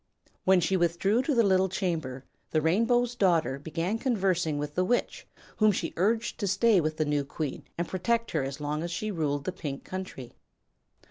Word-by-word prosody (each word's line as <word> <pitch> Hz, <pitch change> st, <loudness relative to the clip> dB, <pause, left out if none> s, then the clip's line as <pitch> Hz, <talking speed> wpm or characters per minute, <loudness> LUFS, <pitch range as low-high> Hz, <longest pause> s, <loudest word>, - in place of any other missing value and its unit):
When 190 Hz, -1 st, +6 dB
she 175 Hz, +3 st, +1 dB
withdrew 175 Hz, +6 st, +2 dB
to 290 Hz, +1 st, 0 dB
the 230 Hz, -, +5 dB
little 190 Hz, -1 st, +3 dB
chamber 160 Hz, -9 st, -3 dB, 0.2 s
the 155 Hz, -, +2 dB
Rainbow's 230 Hz, +9 st, +2 dB
Daughter 170 Hz, -, +2 dB
began 165 Hz, +8 st, -2 dB
conversing 190 Hz, -, +1 dB
with 145 Hz, 0 st, -4 dB
the 180 Hz, -, +1 dB
Witch, 240 Hz, +6 st, -1 dB, 0.3 s
whom 215 Hz, -1 st, +5 dB
she 180 Hz, -3 st, -3 dB
urged 220 Hz, +6 st, 0 dB
to 205 Hz, -, -1 dB
stay 205 Hz, 0 st, +4 dB
with 155 Hz, 0 st, -2 dB
the 155 Hz, -, +1 dB
new 145 Hz, -1 st, +1 dB
queen 145 Hz, 0 st, -5 dB
and 170 Hz, 0 st, -1 dB
protect 230 Hz, +5 st, -1 dB
her -, -, 0 dB
as 135 Hz, +2 st, -5 dB
long 150 Hz, +1 st, -2 dB
as 170 Hz, -, -3 dB
she 215 Hz, +5 st, -3 dB
ruled 145 Hz, -5 st, -1 dB
the 185 Hz, -, -2 dB
Pink 150 Hz, -6 st, -6 dB
Country. 185 Hz, -10 st, -7 dB
180 Hz, 190 wpm, -28 LUFS, 155-205 Hz, 0.3 s, When